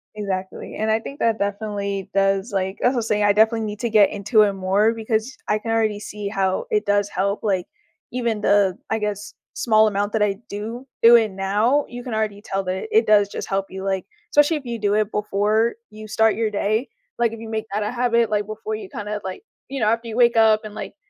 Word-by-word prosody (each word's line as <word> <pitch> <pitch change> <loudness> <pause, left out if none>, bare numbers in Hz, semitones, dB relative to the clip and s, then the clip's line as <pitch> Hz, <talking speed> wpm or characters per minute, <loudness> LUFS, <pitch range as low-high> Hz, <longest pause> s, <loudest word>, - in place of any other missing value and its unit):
Exactly. 190 -3 -5
And 220 +1 -1
I 220 +1 +3
think 275 +5 -9
that 225 -1 +2
definitely 200 -1 -3
does, 195 +2 +1
like 190 0 -2
as 245 - +4
I - - -4
was 230 -2 -1
saying, 210 -1 +1
I 205 - +5
definitely 220 +2 +3
need 210 -1 -4
to 235 - 0
get 210 -2 +6
into 215 +2 +2
it 210 -1 +4
more 195 +3 +2
because 220 +2 -2
I 210 - +1
can 225 +1 -4
already 220 -2 +1
see 210 -1 -6
how 195 -2 -1
it 210 0 +1
does 205 0 +2
help, 200 +2 -1
like, 190 -4 0 0.4
even 235 -4 -1
the, 200 -3 +3
I 220 - +1
guess, 210 -1 -4 0.2
small 220 -2 +3
amount 205 0 -1
that 220 -2 +2
I 200 -2 0
do 225 +5 -6 0.2
it 230 - +9
would 225 -3 +6
now, 210 +9 +1
you 245 0 -8
can 245 -3 -5
already 215 -2 -2
tell 195 -2 -3
that 185 - -3
it 445 +1 +4
does 205 -1 +4
just - - -6
help 195 0 -1
you, 190 +1 -7
like, 190 -1 -1 0.3
specially 295 +2 +4
if 285 - -10
you 235 -1 -4
do 205 -1 +1
it 215 0 +1
before 210 +2 +1 0.2
you 215 0 -10
start 220 0 +2
your 225 -1 0
day, 215 +4 0 0.3
like, 235 -2 +2
if 230 - -8
you 225 - -8
make 220 0 -3
that 210 +1 -1
a 210 - -2
habit, 235 -2 +1
like, 205 -1 0
before 220 - -5
you 415 -3 -8
kinda, 210 - -5
like, 190 - -6 0.3
you 275 0 -4
know, 215 - +1
after 230 +1 0
you 225 0 -5
wake 240 -1 +5
up 220 -1 +4
and, 210 - -8
like, - - -7
215 Hz, 235 wpm, -22 LUFS, 200-225 Hz, 0.4 s, it